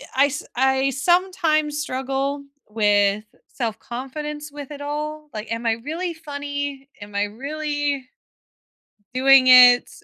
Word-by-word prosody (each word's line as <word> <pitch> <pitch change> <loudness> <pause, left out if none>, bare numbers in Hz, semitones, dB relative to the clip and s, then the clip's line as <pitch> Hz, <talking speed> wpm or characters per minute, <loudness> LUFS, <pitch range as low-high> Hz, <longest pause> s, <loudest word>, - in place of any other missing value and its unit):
I 275 +2 +5
s 290 +1 -5
I 265 +2 +2
sometimes 310 -1 +1
struggle 270 0 -3 0.3
with 205 -1 +2 0.2
self-confidence 270 +6 -6
with 290 0 -9
it 285 -1 -8
all, 300 +1 -5
like, 215 0 -7
"Am 230 +1 -3
I 225 - +3
really 320 +10 -4
funny? 285 -3 -6
Am 205 0 -11
I 200 - +1
really" 285 +4 -3 1.1
"doing 265 0 +5
it?" 250 -1 +8
275 Hz, 120 wpm, -22 LUFS, 245-295 Hz, 1.1 s, it